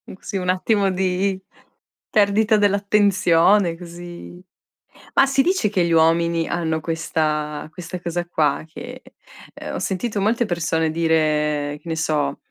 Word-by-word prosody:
così 195 +1 -6
un 180 -1 -3
attimo 195 +1 +1
di 190 +1 -1 0.7
perdita 215 +1 +3
dell'attenzione, 200 -3 +3
così. 175 +1 -10 0.7
Ma 275 - +5
si 270 0 +2
dice 360 - +1
che 185 -4 +1
gli 170 - -1
uomini 165 0 +2
hanno 160 -2 -1
questa 155 -2 -2
questa 180 +1 -7
cosa 175 0 -3
qua 155 -3 0
che 245 +8 -10 0.7
ho - - -4
sentito 205 +2 -2
molte 230 +3 +1
persone 160 -3 -1
dire, 150 -3 0
che 170 - -15
ne 160 - -2
so, 150 -3 -1
175 Hz, 130 wpm, -21 LUFS, 160-200 Hz, 0.7 s, Ma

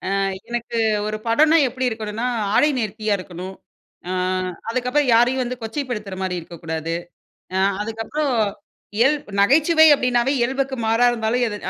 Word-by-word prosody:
அ - - +1 0.3
எனக்கு 235 -1 -3 0.3
ஒரு 215 0 -3
படம்னா 310 +8 +4
எப்படி 255 +1 -2
இருக்கணும்னா 220 +1 -4 0.3
ஆடை 300 - +4
நேர்த்தியா 215 0 -2
இருக்கணும். 185 +1 -8 0.5
அ - - -2 0.6
அதுக்கப்பறம் 255 +2 +1
யாரையும் 250 +2 +3
வந்து 250 0 -5
கொச்சைப்படுத்துற 220 -5 -4
மாரி 180 -1 -2
இருக்கக்கூடாது. 165 0 -5 0.6
அ - - +1 0.2
அதுக்கப்பறம் 225 +6 -2 0.6
இயல் 270 +6 +4 0.2
நகைச்சுவை 315 +9 +5
அப்படின்னாவே 250 -1 +1
இயல்புக்கு 265 +2 -1
மாறா 230 +2 +3
இருந்தாலும் 240 +1 0
எத 210 - -4
235 Hz, 130 wpm, -21 LUFS, 210-260 Hz, 0.6 s, நகைச்சுவை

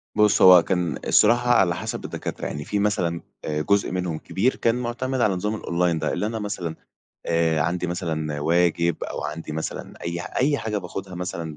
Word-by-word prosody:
بُص 105 -1 +4
هو 90 -2 +9
كان 90 -2 -1
الصراحة 120 +3 +4
على 95 -7 +4
حسب 90 - -5
الدكاترة، - - -5
يعني 75 0 -4
في 105 - -1
مثلًا 90 -5 0 0.2
آآ، 75 0 -1
جزء 100 +3 +1
منهم 90 -3 -2
كبير 120 +7 0
كان 115 0 +1
معتمد 125 +1 -2
على 105 - +3
نظام 105 +4 -2
الأونلاين 85 -4 0
ده، - - -1
اللي - - -1
أنا 110 +1 -3
مثلًا 95 -6 -4 0.5
آآ، 80 -2 +2
عندي 90 +2 0
مثلًا 80 -4 -3
واجب، 85 +1 +2
أو - - -5
عندي 80 -1 -5
مثلًا 80 +1 -6
أي 85 0 -3
ح - - -8
أي 140 +2 +2
حاجة 105 -1 -2
باخدها 95 0 -7
مثلًا 85 -3 -5
90 Hz, 185 wpm, -24 LUFS, 85-105 Hz, 0.5 s, هو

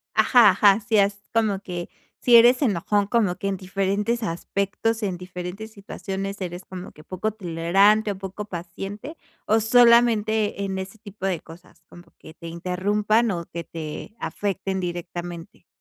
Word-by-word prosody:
Ajá, 240 -4 +6
ajá, 205 -1 +6
así 220 +2 0
es 200 0 +2
como 215 -4 +1
que, 175 -3 -6 0.3
¿si 245 - +5
eres 245 +4 +6
enojón 205 -3 +1
como 205 -5 +1
que 195 - -4
en 195 -1 -1
diferentes 200 +5 -1
aspectos?, 200 +5 -2
en 185 -3 -1
diferentes 180 +4 -7
situaciones 195 -1 -6
eres 175 0 -5
como 185 -1 -8
que 155 - -16
poco 190 +5 -3
tolerante 195 +3 +2
o 195 - -6
poco 195 +2 -6
paciente, 195 - -7 0.3
¿o 220 +1 +3
solamente 225 -3 +4
en 190 -1 -3
ese 190 +3 -7
tipo 205 -2 -8
de 185 -4 0
cosas?, 170 +2 -16
como 175 0 -15
que 160 - -13
te 170 0 -10
interrumpan 205 +6 0
o 170 -2 -4
que 170 +1 -7
te 160 +6 -7
afecten 195 -1 -3
directamente. 175 0 -6
195 Hz, 155 wpm, -24 LUFS, 180-215 Hz, 0.3 s, Ajá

